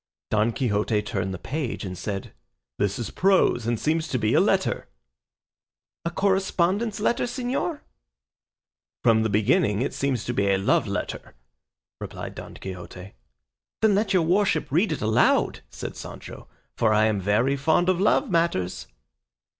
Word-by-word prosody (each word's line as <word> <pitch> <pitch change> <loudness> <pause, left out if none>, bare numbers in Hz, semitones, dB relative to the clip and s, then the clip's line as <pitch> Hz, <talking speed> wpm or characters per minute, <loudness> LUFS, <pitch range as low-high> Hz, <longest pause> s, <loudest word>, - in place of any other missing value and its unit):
Don 110 +2 +2
Quixote 105 -3 0
turned 95 -2 -3
the 95 - -4
page 130 - -4
and 90 -1 -5
said, 100 +1 -5 0.5
"This 100 -1 0
is 115 -3 -4
prose 180 - +2
and 120 -2 0
seems 160 +1 0
to 130 - -1
be 110 -2 +1
a - - +5
letter." - - +1 1.2
"A - - +1
correspondence 195 +3 0
letter, 235 +4 +1
señor?" 255 +6 -2 1.2
"From 115 -2 +4
the 110 - 0
beginning 105 - +2
it - - -3
seems 130 -4 -1
to 120 - -2
be 100 -3 +1
a 95 - +3
love 95 - +2
letter," - - -5 0.6
replied - - -7
Don - - -9
Quixote. 90 0 -9 0.7
"Then 220 -2 +5
let 205 0 +1
your 185 -4 +3
worship 180 -4 +1
read 175 +8 +2
it 155 - -3
aloud," 110 0 +2
said - - -7
Sancho, - - -9 0.3
"for 110 - +2
I 110 +1 +4
am 105 -3 +1
very 110 +8 +2
fond 160 +5 +2
of 185 -1 +2
love 265 +7 +3
matters." 95 - 0
125 Hz, 155 wpm, -25 LUFS, -, 1.2 s, a